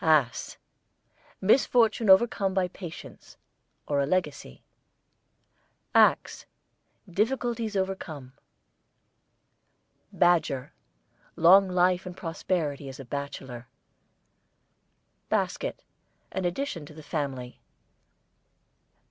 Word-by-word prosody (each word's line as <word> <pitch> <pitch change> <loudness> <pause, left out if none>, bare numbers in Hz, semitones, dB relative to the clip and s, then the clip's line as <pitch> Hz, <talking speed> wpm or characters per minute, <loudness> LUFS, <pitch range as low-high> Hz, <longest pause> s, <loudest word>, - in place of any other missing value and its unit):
ASS, 150 -7 +2 0.8
misfortune 225 0 +3
overcome 195 -1 +4
by 185 -2 +2
patience; 175 -3 -11 0.5
or 145 -1 0
a 140 - 0
legacy. 150 - -2 1.3
AXE, - - +3 0.6
difficulties 225 +2 -1
overcome. 160 -9 -4 1.8
BADGER, 160 -7 +1 0.6
long 190 +4 +6
life 180 0 +2
and 180 0 -8
prosperity 160 -4 -3
as 130 - -10
a 135 - -8
bachelor. 130 -3 -6 1.6
BASKET, - - -2 0.5
an 190 -1 -3
addition 175 - -3
to 155 - -14
the 155 - -11
family. 135 -5 -4
175 Hz, 80 wpm, -27 LUFS, 140-190 Hz, 1.8 s, long